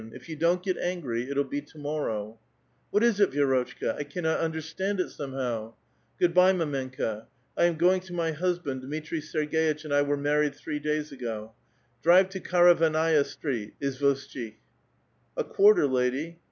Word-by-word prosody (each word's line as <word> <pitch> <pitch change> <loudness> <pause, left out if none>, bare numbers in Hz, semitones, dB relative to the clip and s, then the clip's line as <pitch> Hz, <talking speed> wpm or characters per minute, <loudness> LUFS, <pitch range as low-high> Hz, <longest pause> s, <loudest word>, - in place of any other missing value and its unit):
If 130 - -12
you 160 - -4
don't 170 +3 +1
get 185 -2 -1
augrv, 135 -9 -2
it'll 140 0 +1
be 140 +1 -4
to 150 +2 -19
mor 150 0 -2
row.", 110 +1 -4 0.5
*■ - - -6
*■ - - +5
AVhat - - 0
is 230 -4 +2
it, 200 - +5
Vi^rotchka? 130 -4 0
I - - -1
cannot 160 +3 -1
understand 165 +5 -2
it, 180 - -1
some 140 -2 -6
p.^ 120 -4 -3 0.2
'* - - -41
Good 175 -1 +3
by, 180 +1 +6
mdmenka; 130 - -3 0.3
I - - +3
am 175 -1 +2
going 180 +3 +4
to 185 -1 -11
my 165 -2 0
husband. 170 -5 -2
^^^itri 155 +4 -4
Serg^itch 155 0 -1
and 150 - -3
I 145 - +4
were 145 0 0
married 145 0 +1
three 150 +1 -5
days 150 0 -2
ago. 115 -4 -6 0.5
Drive 180 +3 +6
Karavannaia 165 -4 +3
Street, 120 -9 -5
Izvoshchik." 135 -4 -2 0.8
A - - +1
quarter, 415 0 +5
lady." 130 +6 -1
150 Hz, 175 wpm, -27 LUFS, 135-170 Hz, 0.8 s, by